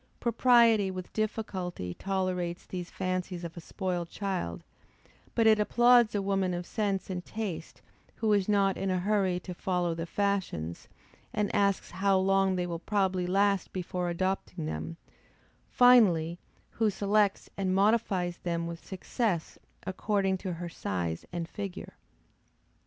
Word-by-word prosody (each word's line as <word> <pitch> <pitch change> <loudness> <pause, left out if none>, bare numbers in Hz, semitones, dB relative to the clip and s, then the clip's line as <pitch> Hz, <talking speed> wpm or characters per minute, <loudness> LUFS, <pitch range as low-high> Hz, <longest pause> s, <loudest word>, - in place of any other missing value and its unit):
Propriety 235 -3 +4
with 185 -1 -7
difficulty 190 - -3
tolerates 185 - -2
these 180 -1 -6
fancies 185 -1 -3
of 170 -1 -6
a 170 - -7
spoiled 175 -1 -3
child: 175 - -3 0.7
but 230 - +3
it 220 -1 +6
applauds 240 0 +5
a 200 - 0
woman 195 -2 0
of 175 0 -4
sense 200 -3 -2
and 180 -1 -4
taste, 185 -8 -6 0.3
who 220 -2 +1
is 200 -1 +2
not 195 -2 +3
in 195 - -1
a 185 - +1
hurry 190 -1 +1
to 180 - -6
follow 175 -1 -1
the 165 +1 -4
fashions 190 - -2 0.5
and 210 -1 -1
asks 200 -1 +1
how 195 0 +2
long 195 0 +3
they 180 -1 -1
will 170 -1 -4
probably 190 -2 0
last 200 +1 +2
before 180 -1 -3
adopting 180 -1 -2
them; 80 - -4 0.7
finally, 180 -10 +5 0.3
who 225 -2 +1
selects 205 0 +1
and 190 -1 0
modifies 195 -4 +2
them 170 -1 -2
with 170 0 -6
success 190 -2 -2 0.3
according 195 +1 0
to 185 -1 -4
her 170 +1 -5
size 90 - -3
and 170 -1 -3
figure. 195 0 -6
190 Hz, 140 wpm, -29 LUFS, 175-205 Hz, 0.7 s, it